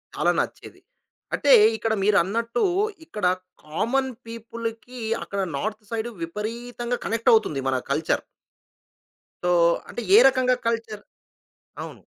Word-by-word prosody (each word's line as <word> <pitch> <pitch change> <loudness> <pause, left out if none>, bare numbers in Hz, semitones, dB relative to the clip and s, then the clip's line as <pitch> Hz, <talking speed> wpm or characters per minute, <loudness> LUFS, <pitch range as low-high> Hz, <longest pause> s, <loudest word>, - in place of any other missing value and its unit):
చాలా - - +2
నచ్చేది. - - -5 0.5
అంటే 285 - +2 0.2
ఇక్కడ 220 0 -1
మీరన్నట్టు 210 - +2 0.4
ఇక్కడ 210 -9 -4 0.4
కామన్ 250 - -1 0.2
పీపుల్‌‌కి, 230 +1 -7 0.2
అక్కడ 200 - -5 0.2
నార్త్ 215 +6 -4
సైడ్ 230 +1 -2
విపరీతంగా 235 +6 -4
కనెక్టవుతుంది 220 -10 +2
మన 130 -1 +1
కల్చర్. 155 +3 0 1.2
సో, 180 - +1 0.4
అంటే - - -5
ఏ - - +10
రకంగా 255 -1 +3
కల్చర్? 225 -2 -2 0.8
అవును. - - -10
225 Hz, 105 wpm, -24 LUFS, 210-240 Hz, 1.2 s, ఏ